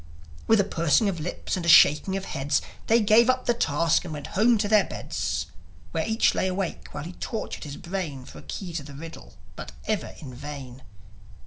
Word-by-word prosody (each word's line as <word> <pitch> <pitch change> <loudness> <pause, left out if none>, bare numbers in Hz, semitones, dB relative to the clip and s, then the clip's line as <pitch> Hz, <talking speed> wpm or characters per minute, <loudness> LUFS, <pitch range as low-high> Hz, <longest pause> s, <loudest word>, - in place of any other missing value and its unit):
With 225 - +5
a - - +5
pursing 170 +3 +2
of 175 -4 -4
lips 170 +5 -3
and 180 - -4
a 170 - 0
shaking 170 +5 +6
of 195 - -5
heads, 140 -2 0 0.3
They 230 +1 +5
gave 220 +3 +5
up 255 0 +1
the 240 - +3
task 165 -6 +1
and 175 - -7
went 145 -2 -6
home 225 +4 +4
to 205 0 0
their 210 -1 +5
beds, - - -3 0.5
Where - - -1
each 220 0 +3
lay 185 - 0
awake 185 -1 -3
while - - -6
he 175 +3 -7
tortured 220 -1 -5
his 140 -1 -7
brain 170 -8 -5
For - - -11
a - - -11
key 180 -4 -6
to 165 - -2
the 140 0 -11
riddle, 165 +3 -10 0.2
but - - -8
ever 215 -5 -2
in 135 -5 -9
vain 135 -1 -8
175 Hz, 210 wpm, -26 LUFS, 150-210 Hz, 0.5 s, shaking